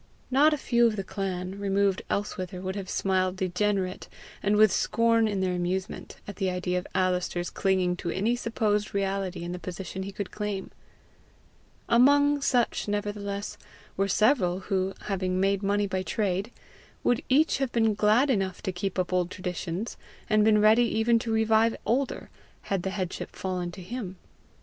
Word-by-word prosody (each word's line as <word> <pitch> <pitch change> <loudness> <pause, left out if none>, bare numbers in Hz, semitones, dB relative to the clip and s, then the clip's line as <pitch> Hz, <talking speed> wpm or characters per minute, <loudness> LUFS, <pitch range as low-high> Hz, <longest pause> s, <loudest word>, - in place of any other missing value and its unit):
Not 290 +4 +5
a 300 - +1
few 240 -3 +3
of 220 - -1
the 195 - -3
clan, 190 0 -4
removed 200 -1 +1
elsewhither, 185 -3 -3
would 190 +1 -4
have 195 -2 -5
smiled 185 -1 0
degenerate, 185 0 -1 0.3
and 205 +1 +2
with 215 -1 +6
scorn 230 +2 +2
in 200 -2 -1
their 185 -1 0
amusement, 180 +2 -3
at 205 - -7
the 190 -2 0
idea 180 0 -1
of 180 - -10
Alister's 180 -1 0
clinging 185 -2 +1
to 175 - -4
any 210 +7 +1
supposed 215 -4 -1
reality 195 -2 -1
in 175 - -4
the 180 - -5
position 185 +2 -6
he 195 +1 -5
could 200 0 -5
claim. 210 -2 -4 1.2
Among 285 +4 +5
such 245 -6 +1
nevertheless 205 -1 -3 0.4
were 195 +1 +1
several 195 -4 +2
who, 190 -1 -1
having 185 -2 -1
made 195 0 +2
money 205 +1 +1
by 190 -1 -2
trade, 200 +2 -1 0.5
would 245 - +2
each 290 +2 +3
have 270 -3 -1
been 225 -2 +2
glad 215 +7 +3
enough 195 -5 -1
to 190 - -1
keep 185 +1 -4
up 185 0 -1
old 180 -1 +1
traditions, 180 +2 -4 0.3
and 215 0 +3
been 215 0 +5
ready 220 +3 +5
even 230 +1 +3
to 225 0 -4
revive 220 +1 +3
older, 265 +4 -1 0.4
had 195 - +1
the 190 - -2
headship 185 -2 -4
fallen 180 -2 -3
to 185 - -9
him. 195 -2 -6
195 Hz, 170 wpm, -27 LUFS, 185-220 Hz, 1.2 s, with